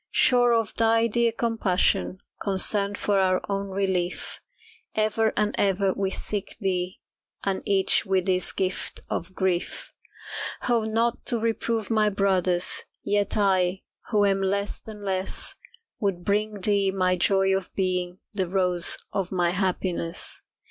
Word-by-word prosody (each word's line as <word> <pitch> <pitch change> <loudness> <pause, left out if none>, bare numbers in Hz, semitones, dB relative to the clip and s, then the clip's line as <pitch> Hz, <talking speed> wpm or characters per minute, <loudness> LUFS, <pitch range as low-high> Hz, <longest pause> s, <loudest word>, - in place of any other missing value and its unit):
Sure 245 -1 +4
of 225 -2 +1
thy 225 0 +4
dear 235 +1 +2
compassion, 205 -5 +1 0.2
Concerned 200 +1 +1
for 200 -1 +1
our 185 -1 +3
own 200 0 -2
relief, 190 -2 -1 0.5
Ever 215 +1 +2
and 210 0 +1
ever 195 -1 +2
we 195 -1 -1
seek 200 +1 -4
thee, 185 -3 -2 0.4
And 195 -1 -1
each 195 -1 +4
with 190 -2 0
his 185 -1 +2
gift 185 -1 -2
of 185 +3 -3
grief. 190 - -1 0.7
Oh, 235 -3 +2
not 230 +2 0
to 240 - +2
reprove 225 0 -1
my 215 -1 +3
brothers, 185 -3 +1 0.2
Yet 205 +1 0
I, 190 -2 +2 0.3
who 210 -3 +3
am 195 -1 +2
less 200 +1 -1
than 210 -2 -10
less, 190 0 -2 0.5
Would 195 -5 -1
bring 210 0 0
thee 200 0 +2
my 185 -1 +1
joy 195 +1 +3
of 190 -1 -3
being 180 -1 -1
The 190 -3 -1
rose 180 -2 +2 0.2
of 190 -2 -2
my 175 -2 +2
happiness. 180 -2 -2
195 Hz, 140 wpm, -25 LUFS, 185-210 Hz, 0.7 s, Sure